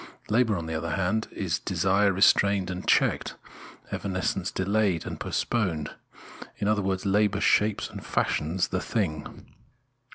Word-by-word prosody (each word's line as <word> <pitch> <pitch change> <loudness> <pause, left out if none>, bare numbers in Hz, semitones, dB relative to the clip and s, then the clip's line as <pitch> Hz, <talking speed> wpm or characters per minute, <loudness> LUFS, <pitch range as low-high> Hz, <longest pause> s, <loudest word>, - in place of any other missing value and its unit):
Labour, 110 -2 +2
on 85 - -4
the 80 - -4
other 80 0 -2
hand, 100 +4 0
is 90 -4 -2
desire 95 +3 +2
restrained 95 0 +3
and 90 0 -6
checked, - - +2 0.6
evanescence 95 -1 -2
delayed 100 -3 0
and - - -6
postponed; 90 -11 -1 0.7
in 100 - -2
other 105 -1 +2
words, 95 0 -2
labour 100 +1 +2
shapes 105 0 +2
and - - -9
fashions 85 +4 0
the - - -1
thing. 80 -9 -3
95 Hz, 135 wpm, -27 LUFS, 90-105 Hz, 0.7 s, restrained